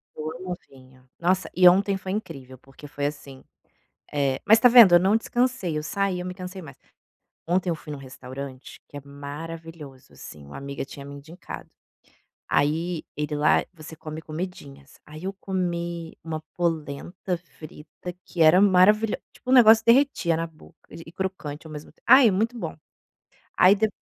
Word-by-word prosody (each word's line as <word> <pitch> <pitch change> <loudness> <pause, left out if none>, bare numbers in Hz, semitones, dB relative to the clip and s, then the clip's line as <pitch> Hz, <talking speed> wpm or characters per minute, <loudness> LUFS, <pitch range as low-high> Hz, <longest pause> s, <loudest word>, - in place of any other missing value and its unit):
Eu 155 0 -5
amo 180 0 -5
vinho. 130 -1 -19
Nossa, 185 +2 0
e 180 0 +7
ontem 195 +2 +4
foi 190 0 -6
incrível 150 -11 -6
porque 135 +3 -14
foi, 145 0 -4
assim, 140 -2 -6 0.7
eh 140 -2 0
mas 220 +2 +6
tá 250 - +7
vendo 230 -7 +9
eu - - +7
não 195 +4 +3
descansei, 235 -7 -1
eu 150 - -4
saí, 195 +2 -1
eu 180 - -5
me 180 - -5
cansei 185 0 -8
mais. 160 - -12 0.7
Ontem 180 +1 +1
eu - - 0
fui 155 -1 -9
num 145 - -6
restaurante 130 0 -9
que - - -12
é - - -5
maravilhoso, 145 0 -9
assim, 75 -1 -12
uma 70 - -11
amiga 140 0 -5
tinha 140 0 -11
me 140 0 -9
indicado. 160 +5 -10 0.8
Aí 160 +3 0
ele 150 0 -2
lá, 150 +1 +3
você 160 -1 -11
come 155 0 -8
comidinhas, 155 -4 -8
aí 155 +2 -11
eu 195 +1 -3
comi 175 -3 -4
uma 160 -1 -4 0.2
polenta 170 +2 -3
frita 155 +1 -11
que 170 - -4
era 160 +4 +7
maravilho 205 +3 +4 0.2
tipo, - - -11
o - - +4
negócio 225 -3 +7
derretia 230 - +3
na 165 - -2
boca 160 -1 -17
de 165 - -10
e 160 - -12
crocante 175 -5 -5
ao 155 - -10
mesmo 150 0 -9
tem - - -36
ai, 260 -2 +8
é - - +3
muito 225 +6 -1
bom. - - -5 0.8
Aí 185 +3 +7
dep 215 +1 0
165 Hz, 175 wpm, -25 LUFS, 145-190 Hz, 0.8 s, vendo